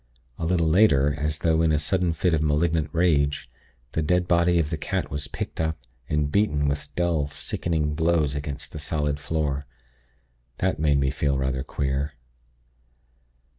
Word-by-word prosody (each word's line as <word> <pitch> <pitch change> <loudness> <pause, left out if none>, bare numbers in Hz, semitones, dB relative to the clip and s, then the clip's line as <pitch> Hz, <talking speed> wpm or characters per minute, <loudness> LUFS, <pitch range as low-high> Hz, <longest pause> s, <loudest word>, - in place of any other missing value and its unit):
A 80 - -2
little 85 -2 +2
later, 75 -6 +4
as 75 +1 -2
though 80 +1 +2
in 80 -1 +3
a 75 - +3
sudden 85 +3 0
fit 85 +2 +1
of 80 - +2
malignant 75 0 +1
rage, 75 -4 +1 0.4
the 80 - -1
dead 90 +3 +1
body 85 0 +3
of 80 -2 0
the 80 - -1
cat - - -3
was 70 0 -3
picked - - -5
up, 80 0 -1 0.3
and 75 -1 0
beaten 75 -8 +2
with 70 0 -2
dull, 85 -5 +1
sickening 75 +1 -2
blows 80 -2 +1
against 70 -1 -5
the 75 - -7
solid 75 -1 -1
floor. 70 -3 -2 0.9
That 95 -4 0
made 75 -2 +3
me 70 -1 +1
feel 70 -1 0
rather 65 -1 -1
queer. 70 +1 -2
75 Hz, 165 wpm, -25 LUFS, 70-85 Hz, 0.9 s, later